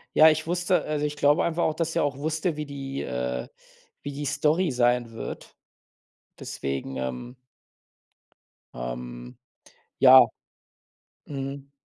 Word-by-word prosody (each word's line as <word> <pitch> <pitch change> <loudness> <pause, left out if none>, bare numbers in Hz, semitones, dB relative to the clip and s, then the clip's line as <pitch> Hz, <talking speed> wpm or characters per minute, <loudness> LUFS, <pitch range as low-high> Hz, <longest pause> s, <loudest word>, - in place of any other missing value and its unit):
Ja, 155 +1 +9
ich 155 +1 0
wusste 175 +2 +1
äh, - - -9
also, 150 -1 0
ich 150 - -3
glaube 145 +4 +3
einfach 170 0 0
auch, 155 - +1
dass 165 0 -2
er - - +2
auch 145 -2 -1
wusste, 155 +2 -1
wie 150 - -3
die, 135 -1 -5
äh 65 0 -3 0.6
wie 145 - -4
die 145 +1 -5
Story 150 +4 +1
sein 120 -1 +2
wird. 115 - -8 0.8
Deswegen, 70 -1 -4
ähm 65 - -5 1.4
ähm. - - -7 0.6
Ja. 130 -2 +9 1.0
Mhm. 140 0 -6
140 Hz, 130 wpm, -26 LUFS, 110-155 Hz, 1.4 s, Ja